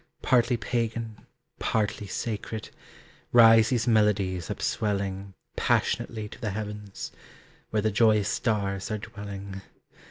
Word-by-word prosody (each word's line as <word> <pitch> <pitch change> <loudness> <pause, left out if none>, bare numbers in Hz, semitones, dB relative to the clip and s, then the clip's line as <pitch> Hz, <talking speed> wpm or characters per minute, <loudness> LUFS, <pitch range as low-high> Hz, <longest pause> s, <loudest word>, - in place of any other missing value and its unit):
Partly 125 -1 +3
pagan, 115 -1 -3 0.3
partly 105 -1 -1
sacred, 110 +2 -4 0.6
Rise 115 -2 +7
these 120 -3 0
melodies 100 -6 +2
upswelling 100 -2 -2 0.2
Passionately 110 -2 0
to - - -12
the 110 - -1
heavens, 105 0 -6 0.6
Where 105 -1 0
the 110 - +2
joyous 105 -1 +4
stars 100 -4 -1
are 110 - -1
dwelling. 100 -3 -7
105 Hz, 105 wpm, -27 LUFS, 100-115 Hz, 0.6 s, Rise